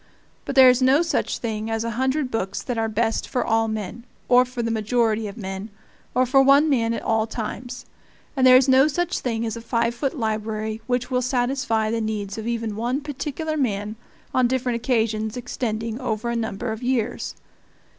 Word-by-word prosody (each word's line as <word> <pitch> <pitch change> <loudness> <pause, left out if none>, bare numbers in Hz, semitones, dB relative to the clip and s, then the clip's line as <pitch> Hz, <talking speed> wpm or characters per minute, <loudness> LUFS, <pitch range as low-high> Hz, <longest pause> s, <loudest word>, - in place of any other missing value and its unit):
But 275 - -4
there 265 -1 +9
is 250 +1 0
no 270 +5 +5
such 335 - -1
thing 220 -1 -3
as 225 0 -1
a 230 - -2
hundred 260 +3 0
books 195 -3 -2
that 245 - -3
are 225 0 0
best 225 +1 -1
for 250 - -1
all 225 0 +2
men, 220 +1 -5 0.2
or 250 0 +6
for 250 -1 -5
the 230 - -1
majority 225 0 +1
of 200 - -9
men, 195 0 -5 0.5
or 255 - +4
for 270 +2 +4
one 275 +3 +5
man 230 -3 +1
at - - -5
all 225 -1 +1
times; 245 +3 -6 0.5
and 260 -2 +4
there 255 0 +9
is 260 +1 +3
no 265 +2 +6
such 350 +3 -1
thing 230 -2 -2
as 225 - -3
a 230 - -7
five 230 0 0
foot 275 +4 -3
library 220 -1 -2
which 250 0 -1
will 250 0 +2
satisfy 245 -3 0
the 230 0 -1
needs 215 -1 -3
of 220 - -5
even 230 -3 -2
one 240 +6 -1
particular 295 +2 -4
man 215 -6 -1 0.4
on 255 -1 +3
different 255 -1 -1
occasions 225 -2 0
extending 230 -2 -3
over 235 -1 -2
a - - -2
number 225 0 -3
of 220 +1 -5
years. 245 -2 -1
235 Hz, 195 wpm, -23 LUFS, 220-255 Hz, 0.5 s, there